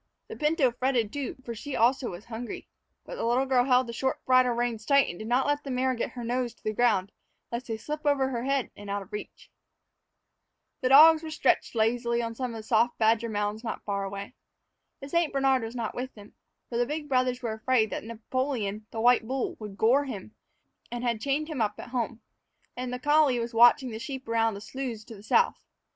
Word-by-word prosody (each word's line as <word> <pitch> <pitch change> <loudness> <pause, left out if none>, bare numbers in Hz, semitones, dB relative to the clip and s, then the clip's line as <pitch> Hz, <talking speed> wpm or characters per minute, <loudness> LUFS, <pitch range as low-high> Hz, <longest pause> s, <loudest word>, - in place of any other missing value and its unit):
The - - -6
pinto 300 -4 +2
fretted, 245 -3 0
too, 285 -3 -4
for 235 - -4
she 270 +5 -6
also 245 +2 +2
was 175 +4 -9
hungry. 235 0 -7 0.4
But - - -7
the - - -3
little 245 +3 +2
girl 255 -2 +3
held 255 -1 +4
the 235 - -7
short 265 +3 -2
bridle 255 -1 +4
reins 235 -2 -2
tight 280 +3 +4
and 175 - -6
did 215 - -6
not 250 +3 +2
let 290 0 0
the 275 - -7
mare 260 0 +1
get 235 - -3
her 245 - -6
nose 240 0 -2
to - - -31
the 215 - -1
ground 205 -4 +2 0.4
lest 235 +2 -4
they 225 -2 -3
slip 300 +7 -5
over 280 -3 +2
her 240 -2 -3
head 275 -1 0
and 205 0 -10
out 200 0 -2
of 195 - -20
reach. 210 - -8 1.3
The 255 - +1
dogs 310 +4 +8
were 320 - -6
stretched 310 -5 +1
lazily 235 +1 +1
on 230 -1 -2
some 235 -2 -4
soft 230 +2 +2
badger 225 +1 +2
mounds 210 +1 -2
not 225 - -5
far 200 -1 -2
away. 200 +3 -6 0.7
The 275 - -8
St. 340 0 +1
Bernard 270 -1 +2
was 225 +2 -6
not 230 -3 -3
with 260 +1 -5
them, 205 -1 -14 0.3
for 235 - -3
the 245 - +3
big 300 0 -4
brothers 255 -2 +1
were 225 -2 -1
afraid 220 0 +1
that - - -4
Napoleon, 225 -2 -3
the 225 - -6
white 240 -1 +4
bull, 265 +1 -2
would 210 -3 -8
gore 260 +7 +3
him, 215 -5 -7 0.6
and 240 0 -4
had 235 -3 -1
chained 285 +2 0
him 305 -7 -3
up 210 -1 0
at - - -9
home; 235 -2 -3 0.5
and 250 0 -4
the 250 - -3
collie 295 -1 +3
was 235 0 -3
watching 240 +2 +5
the 220 - -6
sheep 265 +1 -6
around 225 -1 +1
the 200 - -8
sloughs 245 -2 -5
to 225 - -10
the 200 - -13
south. 460 - +2
240 Hz, 220 wpm, -28 LUFS, 225-265 Hz, 1.3 s, dogs